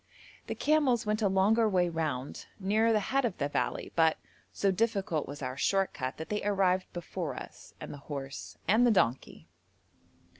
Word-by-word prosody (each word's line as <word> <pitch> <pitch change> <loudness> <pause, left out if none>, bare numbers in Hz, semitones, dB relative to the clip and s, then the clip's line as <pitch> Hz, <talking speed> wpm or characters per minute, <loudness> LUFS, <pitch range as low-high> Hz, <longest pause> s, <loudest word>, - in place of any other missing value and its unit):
The - - -3
camels 285 -7 +2
went 215 +1 0
a 205 - +3
longer 210 +4 +3
way 180 -3 +2
round, 155 -6 -3
nearer 215 +4 +2
the 215 - +3
head 275 0 +3
of 225 -7 -1
the 140 - 0
valley, 145 - -2
but, 160 -1 +4 0.3
so 195 - +1
difficult 195 -5 0
was 145 +1 -7
our 130 0 -3
short 195 +7 +1
cut 130 -1 -4
that 160 - -7
they 210 0 -1
arrived 190 -2 +1
before 175 -4 -4
us, - - -10
and - - -7
the 145 - -9
horse, 140 -1 -6
and 220 +4 +5
the 245 - +5
donkey. 135 - 0
190 Hz, 180 wpm, -30 LUFS, 155-215 Hz, 0.3 s, and